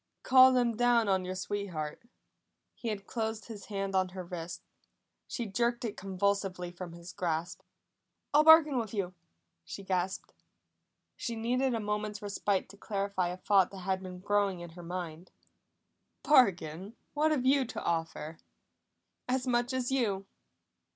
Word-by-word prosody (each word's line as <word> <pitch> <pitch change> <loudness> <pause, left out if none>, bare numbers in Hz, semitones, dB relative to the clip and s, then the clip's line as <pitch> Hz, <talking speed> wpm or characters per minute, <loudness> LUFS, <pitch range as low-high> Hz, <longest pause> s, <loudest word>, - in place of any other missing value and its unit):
"Call 260 0 +8
them 245 -2 +2
down 240 -1 +3
on 190 -2 +2
your 185 +1 -4
sweetheart!" 185 -6 -4 0.7
He 235 - -7
had 210 -3 -3
closed 220 -1 -3
his 210 -4 -9
hand 195 -2 -3
on 185 -1 +2
her 185 0 -6
wrist; 175 -1 -6 0.6
she 240 - -3
jerked 235 +4 0
it 210 - -3
convulsively 190 -2 -1
from 175 -1 -8
his 170 +1 -10
grasp. 170 -3 -2 0.7
"I'll 300 +1 +6
bargain 310 -4 +7
with 225 -2 -4
you!" 185 -3 -2 0.5
she 195 - -8
gasped. 190 0 -2 0.8
She 235 - -4
needed 245 +3 +1
a - - -1
moment's 210 0 -2
respite 205 -1 -1
to 200 - -14
clarify 200 -3 -1
a 180 +1 -4
thought 190 -1 +3
that 195 -1 -9
had 190 0 -1
been 180 -1 -8
growing 200 -2 +1
in 175 -1 -8
her 175 +2 -11
mind. 175 -1 -6 0.9
"Bargain? 195 - +3 0.2
What 305 +2 +2
have 285 -5 0
you 270 +1 +5
to 245 - -6
offer?" 165 -1 -2 0.9
"As 255 0 +1
much 245 0 +1
as 260 -1 -1
you!" 205 -7 0
200 Hz, 150 wpm, -31 LUFS, 180-235 Hz, 0.9 s, Call